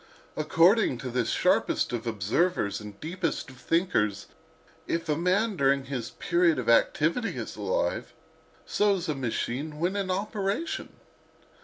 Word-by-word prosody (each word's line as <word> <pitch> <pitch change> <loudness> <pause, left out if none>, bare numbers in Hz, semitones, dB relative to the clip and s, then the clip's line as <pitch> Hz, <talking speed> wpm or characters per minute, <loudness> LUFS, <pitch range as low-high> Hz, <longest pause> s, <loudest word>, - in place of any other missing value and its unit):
According 165 - +4
to 125 0 -5
this 125 -2 0
sharpest - - +1
of 120 0 -3
observers 110 - 0
and 105 -1 -10
deepest 165 -3 -3
of 130 - -15
thinkers, 130 - 0 0.6
if 165 - -2
a 150 - +1
man 190 +6 +1
during 140 -3 +2
his 130 -4 -4
period 170 -2 +2
of 125 - -3
activity 155 - +2
is - - -5
alive, - - -1 0.5
so 205 -1 +2
is 180 - -4
a 155 - 0
machine 135 +3 -3
when 180 +4 0
in 195 -2 -2
operation. 200 - -2
160 Hz, 140 wpm, -27 LUFS, 125-185 Hz, 0.6 s, According